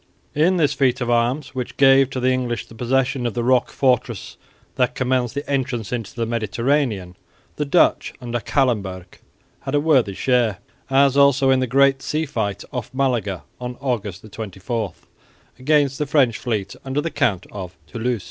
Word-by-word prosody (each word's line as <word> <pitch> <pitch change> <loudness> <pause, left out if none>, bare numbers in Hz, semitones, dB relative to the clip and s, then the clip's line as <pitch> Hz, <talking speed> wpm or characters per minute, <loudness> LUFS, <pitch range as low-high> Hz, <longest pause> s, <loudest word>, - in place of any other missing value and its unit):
In 170 +5 +3
this 145 -4 +2
feat 130 -2 +1
of 120 -1 -1
arms, 120 +5 0
which 125 -2 -5
gave 135 -1 +6
to 130 - -4
the 130 +1 +2
English 125 -2 -1
the - - -15
possession 125 +2 0
of 115 - -5
the 120 - -1
rock 125 0 +3
fortress 130 -3 0 0.4
that 125 -1 0
commands 125 -2 0
the 140 +1 -5
entrance 130 -5 -2
into 115 -4 -4
the 115 -1 -1
Mediterranean, 115 -3 -1 0.4
the 150 - -1
Dutch 155 +5 +3
under 120 -2 -3
Callenberg 100 -8 -1 0.4
had 135 - -3
a - - +4
worthy 135 -10 +2
share, 120 -5 +1 0.3
as 135 0 +4
also 140 -1 +5
in 130 - +4
the 130 - 0
great 135 +2 +3
sea 155 +3 -1
fight 100 -8 -3
off 125 -4 -4
Malaga 115 - 0 0.2
on 125 0 -6
August 110 -9 -3
24, 105 -1 -4 0.7
against 140 0 +2
the 150 - -1
French 135 -6 +2
fleet 105 -6 -3
under 135 +1 -2
the 165 +2 -2
Count 95 -9 0
of 90 -3 -8
Toulouse. 120 0 -2
125 Hz, 170 wpm, -21 LUFS, 115-135 Hz, 0.7 s, gave